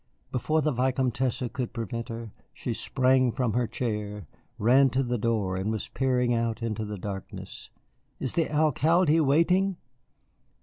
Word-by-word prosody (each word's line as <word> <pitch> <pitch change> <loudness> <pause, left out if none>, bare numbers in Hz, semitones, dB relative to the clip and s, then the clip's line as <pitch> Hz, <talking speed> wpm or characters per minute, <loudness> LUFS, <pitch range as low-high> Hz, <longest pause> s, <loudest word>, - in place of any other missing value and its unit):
Before 155 +5 +1
the 150 - +2
Vicomtesse 130 0 0
could 125 -4 -3
prevent 115 0 -4
her 115 -1 -6 0.2
she - - -4
sprang 130 -1 +2
from 120 -2 -1
her 120 -1 +1
chair, 105 -5 -3 0.3
ran 130 +5 +5
to 135 +2 0
the 120 -1 -1
door, 105 -4 0
and 95 +3 -2
was 110 -1 -3
peering 125 -2 +1
out 115 0 -1
into 110 -1 -2
the 105 0 -5
darkness. 95 0 -7 0.5
"Is 130 - -2
the 165 -2 +1
Alcalde 155 +2 +3
waiting?" 170 +6 +3
125 Hz, 145 wpm, -27 LUFS, 115-135 Hz, 0.5 s, ran